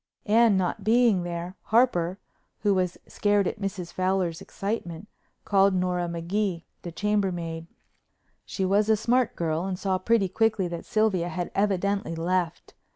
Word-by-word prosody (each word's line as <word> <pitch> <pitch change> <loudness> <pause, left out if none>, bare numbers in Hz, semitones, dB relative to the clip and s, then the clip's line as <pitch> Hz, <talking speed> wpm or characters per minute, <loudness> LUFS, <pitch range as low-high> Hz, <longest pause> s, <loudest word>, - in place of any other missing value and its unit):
Anne 220 -1 +4
not 190 +2 -1
being 225 -3 +4
there, 175 +1 -5
Harper, 195 -7 +2 0.4
who 205 -2 +3
was 185 -2 0
scared 205 -1 +1
at 215 - -4
Mrs. 185 -3 -4
Fowler's 185 -2 0
excitement, 195 -2 -5 0.4
called 195 -1 +4
Nora 180 -1 0
Magee, 170 +1 -2 0.2
the 175 - -7
chambermaid. 175 -5 -1 0.8
She 190 - -3
was 205 +3 +2
a 220 - +5
smart 245 +3 +1
girl 165 0 -1
and 190 -1 -3
saw 190 0 -1
pretty 215 0 +2
quickly 215 0 +1
that 170 -1 -6
Sylvia 210 -6 +1
had 175 -1 -4
evidently 200 -2 0
left. 170 0 -2
190 Hz, 145 wpm, -26 LUFS, 175-210 Hz, 0.8 s, a